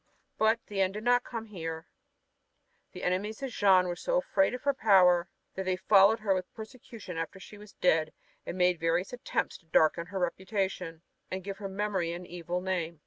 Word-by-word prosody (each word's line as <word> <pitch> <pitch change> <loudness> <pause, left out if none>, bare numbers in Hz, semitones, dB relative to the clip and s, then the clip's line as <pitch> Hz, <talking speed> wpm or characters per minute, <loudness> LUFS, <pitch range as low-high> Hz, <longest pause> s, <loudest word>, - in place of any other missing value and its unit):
But 220 +1 +3
the 200 -2 -2
end 190 +1 +1
did 210 - -5
not 245 +1 +3
come 230 -2 -6
here. 165 -6 -6 1.1
The - - -9
enemies 205 +7 -2
of 270 - -3
Jeanne 190 -4 +4
were 175 - -2
so - - -1
afraid 290 - +1
of 250 - -9
her 280 - +2
power 185 -7 +4 0.2
that 190 - -4
they 185 0 +1
followed 200 +3 +5
her 200 -3 +2
with 185 -1 -3
persecution 220 -6 -9
after 165 +4 -5
she 205 +2 -12
was 210 0 -13
dead 160 -3 +2 0.3
and 180 - -6
made 180 -2 +3
various 165 +6 0
attempts 245 - -2
to 165 - -29
darken 160 +2 +3
her 195 +2 -6
reputation, 185 -2 -2 0.3
and 185 0 -4
give 195 0 -6
her 200 -2 -5
memory 190 -4 -1
an 175 +1 -7
evil 175 0 -4
name. 170 -4 -3
190 Hz, 195 wpm, -30 LUFS, 175-215 Hz, 1.1 s, followed